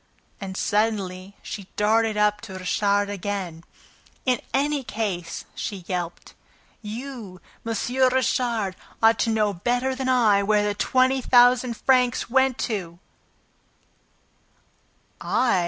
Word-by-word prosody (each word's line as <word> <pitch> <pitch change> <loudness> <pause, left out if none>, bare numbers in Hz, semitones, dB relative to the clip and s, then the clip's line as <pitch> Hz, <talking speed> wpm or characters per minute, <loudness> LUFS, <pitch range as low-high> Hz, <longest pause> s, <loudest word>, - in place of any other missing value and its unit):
And, 190 -1 -6
suddenly, 200 -3 -1
she 200 -3 -7
darted 220 +1 +2
up 210 0 +2
to 205 -4 -9
Richard 200 +2 +1
again. 195 -4 -4 0.6
"In 255 -2 +1
any 285 0 0
case," 200 -7 -4
she 195 -4 -5
yelped, 175 -2 -5 0.5
"you, 225 -3 -7 0.2
M. 230 0 -2 0.4
Richard, 235 -6 0 0.3
ought 225 0 +5
to 230 - +1
know 215 -2 +1
better 245 +8 0
than 260 0 -3
I 220 -6 +4
where 210 +1 +2
the 205 0 0
twenty 260 +5 +2
thousand 245 -1 +4
francs 250 -3 +2
went 265 -1 +3
to!" 175 -5 -4 2.2
"I?" 240 -7 +2
215 Hz, 115 wpm, -24 LUFS, 200-245 Hz, 2.2 s, ought